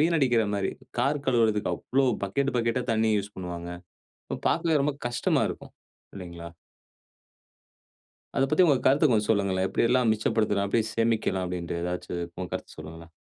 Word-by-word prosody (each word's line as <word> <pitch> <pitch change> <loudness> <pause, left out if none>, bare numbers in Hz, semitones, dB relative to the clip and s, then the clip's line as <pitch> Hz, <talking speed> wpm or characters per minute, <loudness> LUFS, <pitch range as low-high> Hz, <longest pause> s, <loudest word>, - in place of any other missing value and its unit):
வீணடிக்கிற 135 -9 +3
மாரி. 100 -1 -1 0.3
கார் 140 +2 0
கழுவுறதுக்கு 115 -4 +2
அவ்வளவு, 130 -1 +1
பக்கெட் 140 +8 -1
பக்கெட்டா 115 +2 0
தண்ணீய 110 -1 +2
யூஸ் 100 +1 -6
பண்ணுவாங்க. 85 -2 -6 0.6
அப்ப - - -4
பாக்கவே 160 -3 +2
ரொம்ப 145 +1 +1
கஷ்டமா 120 0 +1
இருக்கும். - - -9 0.4
இல்லைங்களா? 85 -3 -8 1.9
அத 135 - +3
பத்தி 155 +6 +4
உங்க 155 -5 +5
கருத்த 140 +4 +4
கொஞ்சம் 105 -3 +2
சொல்லுங்களேன்? 95 -3 +1
எப்படியெல்லாம் 120 +2 +2
மிச்சப்படுத்தலாம்? 105 -2 0
எப்படி 115 +3 +2
சேமிக்கலாம்? 115 -5 +1
அப்படின்ட்டு 85 -1 -4
ஏதாச்சும் 90 0 -3 0.2
உங்க 90 -1 -4
கருத்த - - -6
சொல்லுங்களேன்? 80 +1 -10
110 Hz, 140 wpm, -27 LUFS, 95-130 Hz, 1.9 s, உங்க